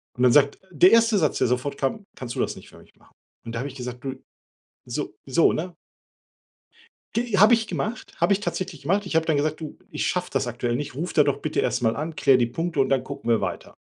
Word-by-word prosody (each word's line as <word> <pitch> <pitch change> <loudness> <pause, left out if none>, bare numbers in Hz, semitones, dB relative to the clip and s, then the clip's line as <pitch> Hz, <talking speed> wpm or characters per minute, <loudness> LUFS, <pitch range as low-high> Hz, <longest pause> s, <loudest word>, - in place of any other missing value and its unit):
Und 125 - -1
dann 125 - +6
sagt 140 +1 +4
der 180 +3 +6
erste 230 -1 +5
Satz, 155 -6 +1
der - - +3
sofort 125 +3 -1
kam: 195 +10 -2
„Kannst 120 -2 -6
du - - -4
das - - -1
nicht - - -13
für - - -16
mich - - -21
machen?“ - - -26 0.3
Und 115 - -6
da - - -2
hab 130 - -3
ich 135 - -9
gesagt: 125 -2 -7
„Du, 135 -1 -4 0.7
so“ - - -4
so, 135 +5 +3
ne? 175 +2 -4 1.4
G 230 -3 0
habe 215 +4 +8
ich 225 -1 -2
gemacht, 220 +2 -4
habe 170 +4 +3
ich 195 - 0
tatsächlich 185 -7 -4
gemacht. 195 +7 +1
Ich 175 - -4
habe 160 0 +3
dann 160 - +2
gesagt: 155 +2 -1
„Du, 155 -2 -8
ich - - -3
schaff 180 0 -1
das 135 -1 0
aktuell 120 0 -2
nicht, 145 +1 -4
ruf 160 +7 -4
da 150 - +5
doch 140 -1 0
bitte 155 - -1
erst - - 0
mal 115 -1 +2
an, 155 +4 -4
klär 135 -4 +4
die 120 - +3
Punkte 165 +6 -3
und - - +1
dann 135 -2 +2
gucken 120 - -4
wir 115 - +3
weiter.“ - - -5
145 Hz, 250 wpm, -24 LUFS, 125-180 Hz, 1.4 s, habe